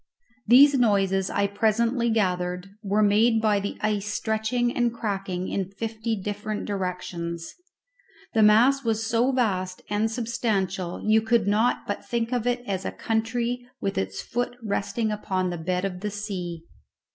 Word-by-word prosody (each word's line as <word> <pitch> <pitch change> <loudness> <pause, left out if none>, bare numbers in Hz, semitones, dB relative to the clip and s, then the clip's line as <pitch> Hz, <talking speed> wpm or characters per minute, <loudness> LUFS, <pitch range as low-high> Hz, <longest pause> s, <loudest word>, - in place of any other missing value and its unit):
These 270 +4 +7
noises, 195 -4 +2
I 200 - +1
presently 230 +4 +1
gathered, 180 -3 -1
were 210 0 +1
made 220 +3 +4
by 215 -2 +2
the 200 +1 -4
ice 210 -1 0
stretching 220 +3 0
and 240 -1 +2
cracking 195 -5 -3
in 195 -2 -2
fifty 220 +1 -3
different 205 +2 -4
directions. 175 -3 -4 0.8
The 220 - +3
mass 240 +6 +5
was 225 -1 0
so 230 +3 +2
vast 185 -8 -1
and 210 +2 +1
substantial 215 -6 -2
you 220 +1 +5
could 225 +1 +2
not 215 +4 +2
but 205 - -4
think 235 0 -2
of 245 -1 0
it 245 0 0
as 195 -3 -2
a - - -3
country 235 +2 -1 0.2
with 195 - -2
its 95 0 -3
foot 245 0 -3
resting 215 +1 -1
upon 185 -3 -1
the 175 - -4
bed 180 +3 -1
of 180 -2 -4
the 210 +2 -3
sea. 185 -5 -5
210 Hz, 155 wpm, -25 LUFS, 195-230 Hz, 0.8 s, These